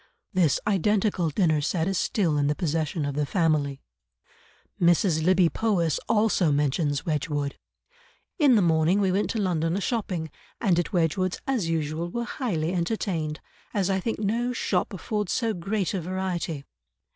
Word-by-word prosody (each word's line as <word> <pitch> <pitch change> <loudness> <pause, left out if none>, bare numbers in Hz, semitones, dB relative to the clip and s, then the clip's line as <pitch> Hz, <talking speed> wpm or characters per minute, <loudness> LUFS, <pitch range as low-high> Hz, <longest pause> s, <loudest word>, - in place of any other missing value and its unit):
This 170 -7 +3
identical 200 -2 +1
dinner 155 -1 +2
set 160 +3 0
is 195 - 0
still 175 -5 +1
in 145 -1 +2
the 150 - +1
possession 160 -2 -1
of 145 - -2
the 150 +1 0
family. 150 -4 0 1.0
Mrs. 170 -1 +3
Lybbe 180 -1 +4
Powys 180 -9 +1
also 210 -7 +3
mentions 145 0 0
Wedgwood. 145 -2 -2 0.8
"In 285 -5 +6
the 205 - +4
morning 165 +3 +3
we 195 -2 +2
went 200 +3 0
to 225 - -1
London 170 -3 0
a - - 0
shopping, 190 - -2 0.3
and 185 -6 +2
at 175 - -2
Wedgwood's 180 +1 0
as 240 -11 0
usual 160 +1 -2
were 235 +6 -3
highly 180 - -2
entertained, 170 -4 -2 0.3
as 195 -1 +1
I 190 - +1
think 225 +4 -2
no 230 +4 0
shop 240 - 0
affords 210 +1 -3
so 230 -3 0
great 195 +2 -2
a 190 - -1
variety." 175 -4 -3
175 Hz, 155 wpm, -26 LUFS, 155-200 Hz, 1.0 s, In